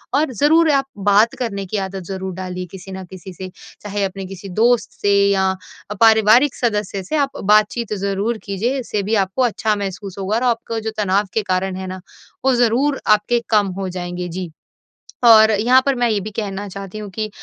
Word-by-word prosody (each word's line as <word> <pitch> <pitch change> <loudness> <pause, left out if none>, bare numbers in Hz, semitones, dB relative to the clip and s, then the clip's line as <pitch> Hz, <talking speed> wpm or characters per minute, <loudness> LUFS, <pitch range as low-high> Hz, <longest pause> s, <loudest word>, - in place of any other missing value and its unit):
और 285 -3 +1
ज़रूर 315 +7 +4
आप 275 -1 +2 0.2
बात 215 +4 +4
करने 200 -6 -3
की 200 +3 -3
आदत 190 -1 -7
ज़रूर 190 -1 -4
डालिए 185 -1 -5
किसी 190 0 -10
न 190 0 -6
किसी 185 0 -10
से 185 +1 -8 0.3
चाहे 205 -1 -3
अपने 195 0 -4
किसी 195 +1 -9
दोस्त 230 +5 +2
से 200 0 +2 0.2
या 190 -1 +2 0.4
अ, - - -1
पारिवारिक 225 +4 +5
सदस्य 210 -4 -2
से 190 - -4
आप 280 0 -1
बातचीत 215 +2 +2
ज़रूर 200 +4 -1
कीजिए। 225 +7 -2
इससे 215 -5 -3
भी 215 +3 0
आपको 190 +7 -4
अच्छा 220 -2 0
महसूस 195 -1 -6
होगा 195 +3 -1
और 240 - 0
आपका 230 0 -6
जो 220 0 -4
तनाव 200 0 +1
के 220 - +1
कारण 185 +1 0
है 190 0 -6
ना 185 0 -7 0.4
वो 265 - +4
ज़रूर 245 +4 +2
आपके 215 +3 +3
कम 210 -3 +3
हो 190 -1 -3
जाएँगे, 180 0 -5
जी। 175 0 -6 0.7
और 220 -1 +8
यहाँ 240 +5 +4
पर 275 -1 +2
मैं 240 -1 +1
ये 210 -2 +1
भी 215 +2 -6
कहना 200 -1 -4
चाहती 195 +1 -8
हूँ 210 -2 -7
कि 215 +2 -4
205 Hz, 200 wpm, -19 LUFS, 190-230 Hz, 0.7 s, और